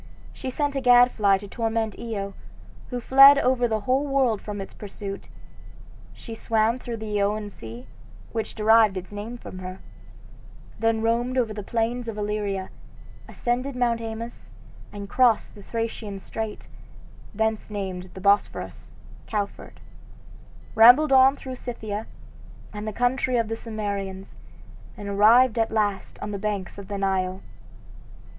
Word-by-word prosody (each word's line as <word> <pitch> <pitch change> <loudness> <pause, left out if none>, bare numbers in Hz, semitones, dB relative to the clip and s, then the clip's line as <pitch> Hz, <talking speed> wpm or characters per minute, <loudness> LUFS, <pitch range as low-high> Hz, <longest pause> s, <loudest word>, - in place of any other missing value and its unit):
She 260 - -5
sent 285 +2 -1
a 270 - 0
gadfly 245 -5 +5
to 200 +1 -10
torment 225 -1 -2
Io, 200 -4 -4 0.6
who 245 - -3
fled 275 +3 +8
over 250 -2 +2
the 220 -2 -1
whole 260 +6 +1
world 265 -6 +1
from 205 -1 -6
its 195 - -7
pursuit. 200 -1 -8 0.8
She 230 - -10
swam 225 +2 +1
through 240 -2 -5
the 210 -2 -2
Ionian 205 +1 -1
sea, 115 - -10 0.5
which 225 -1 -4
derived 220 -2 +4
its 185 +1 -7
name 210 +4 -6
from 185 - -9
her, 185 0 -7 1.0
then 225 0 +1
roamed 240 +3 0
over 230 -4 +1
the 210 - -5
plains 235 +3 -2
of 225 -2 -5
Illyria, 205 -2 -2 0.6
ascended 250 +2 -2
Mount 240 -2 +1
Haemus, 230 +1 -7 0.4
and 200 -1 -7
crossed 240 +1 +2
the 205 - -12
Thracian 225 -2 -4
strait, 215 +2 -6 0.7
thence 220 0 -1
named 190 -3 -5
the 190 - -8
Bosphorus 200 +2 0 0.3
(cow 210 -2 0
ford), 200 - -14 0.9
rambled 245 +7 +7
on 265 +1 +6
through 260 -2 -8
Scythia, 220 -4 -5 0.7
and 210 +1 -6
the - - -1
country 245 +2 +1
of 230 -2 0
the 225 - -1
Cimmerians, 200 -4 -5 0.6
and 205 -2 -7
arrived 225 +4 +5
at 225 - +2
last 210 -3 -1
on 210 - -4
the 200 - -4
banks 200 -2 -3
of 200 - -9
the 200 0 -4
Nile. 190 -1 -1
220 Hz, 145 wpm, -25 LUFS, 200-240 Hz, 1.0 s, fled